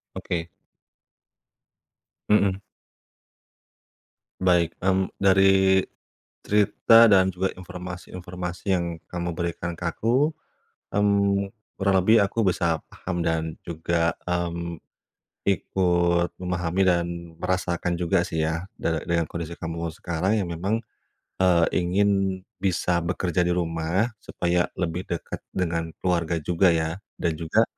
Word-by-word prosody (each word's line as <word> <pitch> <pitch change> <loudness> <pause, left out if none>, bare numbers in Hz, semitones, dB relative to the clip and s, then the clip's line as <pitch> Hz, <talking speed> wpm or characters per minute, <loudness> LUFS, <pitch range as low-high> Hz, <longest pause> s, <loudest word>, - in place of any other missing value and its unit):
Oke. 85 -1 -3 1.8
Mhm. 100 -2 +3 1.8
Baik, 85 -2 +3
mmm, 95 0 +2
dari 95 0 +5 0.6
cerita 105 +2 +5
dan 95 -4 +6
juga 95 +1 -1
informasi-informasi 90 -1 -7
yang 85 -2 0
kamu 85 -1 -4
berikan 85 0 -3
ke 90 - -8
aku, 130 - +2 0.6
mmm, 100 -1 +2 0.3
kurang 95 0 +2
lebih 110 +5 +6
aku 115 +3 -1
bisa 85 -4 +1
paham 90 -2 -4
dan 80 -1 -1
juga, 85 0 0 0.2
mmm, 85 -1 -2 0.8
ikut 85 -2 +1
memahami 90 0 -1
dan 85 -2 +3 0.4
merasakan 90 -1 -1
juga 90 +1 +2
sih 80 -2 -1
ya, 80 +3 -2 0.2
da 80 -2 0
dengan 85 -1 0
kondisi 85 +1 -6
kamu 85 0 -4
sekarang 90 +5 0
yang 95 - -2
memang, 100 +7 0 0.7
eee, 85 -2 +4
ingin 95 +3 +2 0.5
bisa 90 -2 +1
bekerja 90 0 0
di 90 - +2
rumah, 85 +4 0
supaya 85 -3 0 0.2
lebih 90 +1 -2
dekat 85 - -4 0.2
dengan 85 -2 -1
keluarga 85 -2 0
juga 90 +3 +3
ya, 80 0 -1 0.2
dan 85 -3 0
juga, 85 +7 +2
90 Hz, 110 wpm, -25 LUFS, 85-95 Hz, 1.8 s, dan